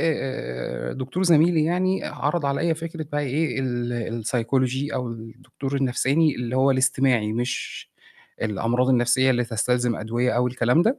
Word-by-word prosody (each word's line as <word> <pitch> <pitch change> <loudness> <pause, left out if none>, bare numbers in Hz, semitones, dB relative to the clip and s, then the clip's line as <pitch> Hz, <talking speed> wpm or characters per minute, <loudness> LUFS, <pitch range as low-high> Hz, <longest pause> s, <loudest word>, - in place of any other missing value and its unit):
آآ، 130 - -3
آآ، - - -5
دكتور 130 +7 -3
زَميلي 165 -2 +4
يعني 185 +3 0
عَرض 150 +1 -1
عليّا 160 +4 +1
فكرة 165 0 -6
بقى 145 - 0
إيه، 140 -1 -1
ال 120 -2 -2
السيكولوجي 120 +4 -1
أو 125 -2 -2
الدكتور 115 +4 -6
النفساني 135 +3 +2
اللي 125 +1 -3
هو 135 +1 +4
الاستماعي 130 -4 +2
مش 120 +3 -4 0.5
الأمراض 115 +4 0
النَفْسيّة 130 +1 +3
اللي 125 -1 +2
تستلزم 120 +1 0
أدوية 120 +4 -1
أو 120 +2 +2
الكلام 125 +5 +2
ده، 230 +8 +1
130 Hz, 150 wpm, -24 LUFS, 120-145 Hz, 0.5 s, زَميلي